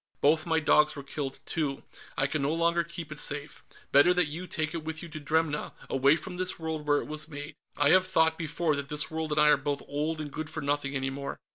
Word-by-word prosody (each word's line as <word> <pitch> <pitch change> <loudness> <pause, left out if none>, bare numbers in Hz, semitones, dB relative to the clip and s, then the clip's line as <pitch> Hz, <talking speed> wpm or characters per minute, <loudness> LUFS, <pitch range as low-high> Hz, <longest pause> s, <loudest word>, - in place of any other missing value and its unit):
Both 155 +3 +3
my 160 -1 +3
dogs 150 0 +4
were 140 - -7
killed, 140 -1 -4
too. 145 -4 -2 0.3
I 135 - +2
can 145 +1 -1
no 145 +3 +1
longer 170 +1 +2
keep 170 -1 -8
it 150 - -3
safe. 145 0 -3 0.3
Better 145 +6 +6
that 180 -4 +2
you 175 +5 -5
take 155 -3 -2
it 165 -2 -4
with 160 +1 -5
you 170 - -7
to 155 - -7
Dremna, 155 0 0 0.2
away 135 +3 +5
from 180 +3 -7
this 185 0 0
world 160 -2 -4
where 145 0 +3
it - - -10
was 155 0 -5
made. 145 0 -7 0.2
I 145 0 +4
have 185 0 +5
thought, 160 -3 +3
before, 160 -1 -1
that 140 0 -4
this 150 +1 0
world 160 -1 -3
and 150 - +2
I 150 0 +6
are 150 - +6
both 145 -1 -3
old 155 +2 -2
and 150 -2 -5
good 155 -1 -4
for - - -4
nothing 145 0 -1
any 135 0 -1
more." 140 +1 -5
155 Hz, 250 wpm, -29 LUFS, 145-160 Hz, 0.3 s, Better